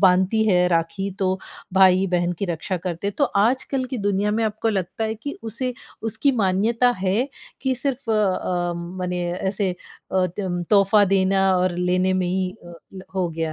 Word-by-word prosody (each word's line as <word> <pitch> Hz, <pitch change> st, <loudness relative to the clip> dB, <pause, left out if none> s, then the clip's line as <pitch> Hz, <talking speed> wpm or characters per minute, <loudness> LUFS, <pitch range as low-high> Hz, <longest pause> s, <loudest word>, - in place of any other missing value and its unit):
बाँधती 190 Hz, +3 st, +4 dB
है 180 Hz, -2 st, +4 dB
राखी 170 Hz, +4 st, 0 dB
तो, 190 Hz, -1 st, +1 dB, 0.4 s
भाई-बहन 185 Hz, -2 st, +4 dB
की -, -, -1 dB
रक्षा 175 Hz, +2 st, -2 dB
करते 180 Hz, +3 st, -3 dB
तो 285 Hz, +7 st, +1 dB, 0.2 s
आजकल 260 Hz, +2 st, 0 dB
की 250 Hz, -, -1 dB
दुनिया 205 Hz, 0 st, +1 dB
में 225 Hz, +1 st, 0 dB
आपको 220 Hz, +1 st, -1 dB
लगता 195 Hz, +2 st, -2 dB
है 220 Hz, 0 st, -1 dB
कि 285 Hz, +7 st, -7 dB
उसे 235 Hz, +3 st, -3 dB, 0.4 s
उसकी 280 Hz, +6 st, +2 dB
मान्यता 225 Hz, +6 st, +2 dB
है, 200 Hz, +8 st, +1 dB, 0.3 s
कि 265 Hz, -1 st, 0 dB
सिर्फ 270 Hz, 0 st, -3 dB
अ -, -, +3 dB
अ, 185 Hz, -4 st, 0 dB
मने 180 Hz, +1 st, -4 dB
ऐसे 190 Hz, +1 st, -1 dB, 0.4 s
अ, 185 Hz, -1 st, +3 dB
तम 180 Hz, -1 st, -3 dB
तोहफा 205 Hz, 0 st, +5 dB
देना 195 Hz, 0 st, +3 dB
और 180 Hz, 0 st, +1 dB
लेने 180 Hz, +1 st, +1 dB
में 185 Hz, -1 st, 0 dB
ही 185 Hz, +1 st, 0 dB
अ, 175 Hz, -, -11 dB, 0.2 s
ल 190 Hz, -, -8 dB
हो 185 Hz, -2 st, 0 dB
गया 160 Hz, -1 st, -3 dB
190 Hz, 175 wpm, -23 LUFS, 180-220 Hz, 0.4 s, तोहफा